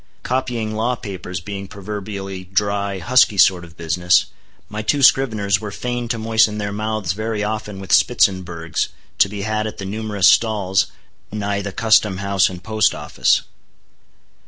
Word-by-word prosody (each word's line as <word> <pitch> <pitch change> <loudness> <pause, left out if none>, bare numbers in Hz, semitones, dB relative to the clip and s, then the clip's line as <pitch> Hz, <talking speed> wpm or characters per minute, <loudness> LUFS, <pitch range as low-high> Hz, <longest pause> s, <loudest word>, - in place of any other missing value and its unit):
Copying 120 -4 -2
law 115 +3 0
papers 95 -6 -6
being 100 +1 -6
proverbially 100 -1 -6
dry, 100 +1 -1
husky 110 +2 +3
sort 90 -2 +5
of 80 -2 -14
business, 85 +2 +2 0.4
my 105 +1 -5
two 140 +6 0
scriveners 110 -8 +3
were 105 - -5
fain 120 +3 -4
to 115 0 -2
moisten 110 -1 +2
their 100 -1 -3
mouths 110 -3 -2
very 110 +1 -3
often 105 -2 -4
with 95 0 -7
Spitzenbergs 90 -9 +2 0.3
to 100 - +5
be 100 -1 -5
had 110 +1 -1
at 110 - -7
the 100 - -6
numerous 105 -2 0
stalls 95 -2 +3 0.4
nigh 100 -1 -2
the 100 0 -5
Custom 110 -2 +3
House 100 -1 +2
and 90 -1 -9
Post 110 -1 +1
Office. 75 0 +1
105 Hz, 155 wpm, -20 LUFS, 95-110 Hz, 0.4 s, sort